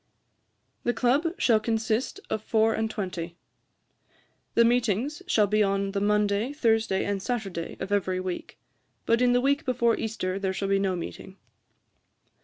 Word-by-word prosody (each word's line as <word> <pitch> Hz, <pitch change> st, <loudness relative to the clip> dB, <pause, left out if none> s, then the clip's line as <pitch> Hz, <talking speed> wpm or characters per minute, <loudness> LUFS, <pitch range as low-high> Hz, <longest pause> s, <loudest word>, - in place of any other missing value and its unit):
] -, -, -47 dB
'The 240 Hz, -, 0 dB
Club 260 Hz, +8 st, +2 dB
shall 225 Hz, -3 st, +4 dB
consist 225 Hz, -, -1 dB
of 215 Hz, -, -2 dB
four 220 Hz, 0 st, +2 dB
and 220 Hz, 0 st, -1 dB
twenty. 180 Hz, -5 st, -5 dB, 1.2 s
'The 235 Hz, -, +6 dB
meetings 245 Hz, -, +1 dB
shall 215 Hz, -11 st, +4 dB
be 215 Hz, +1 st, +1 dB
on 195 Hz, -1 st, +1 dB
the 200 Hz, 0 st, -2 dB
Monday, 210 Hz, +3 st, +1 dB
Thursday, 225 Hz, -8 st, +1 dB
and 200 Hz, -1 st, -2 dB
Saturday 195 Hz, -8 st, -4 dB
of 190 Hz, +1 st, -5 dB
every 190 Hz, -2 st, +1 dB
week; 185 Hz, -1 st, -5 dB, 0.5 s
but 230 Hz, +1 st, +2 dB
in 245 Hz, -1 st, +4 dB
the 245 Hz, -, +4 dB
week 280 Hz, +4 st, +1 dB
before 240 Hz, -4 st, +2 dB
Easter 195 Hz, -4 st, -3 dB
there 190 Hz, -1 st, -1 dB
shall 195 Hz, +1 st, -2 dB
be 195 Hz, 0 st, +3 dB
no 195 Hz, -2 st, 0 dB
meeting. 185 Hz, +2 st, -7 dB
215 Hz, 160 wpm, -27 LUFS, 195-235 Hz, 1.2 s, The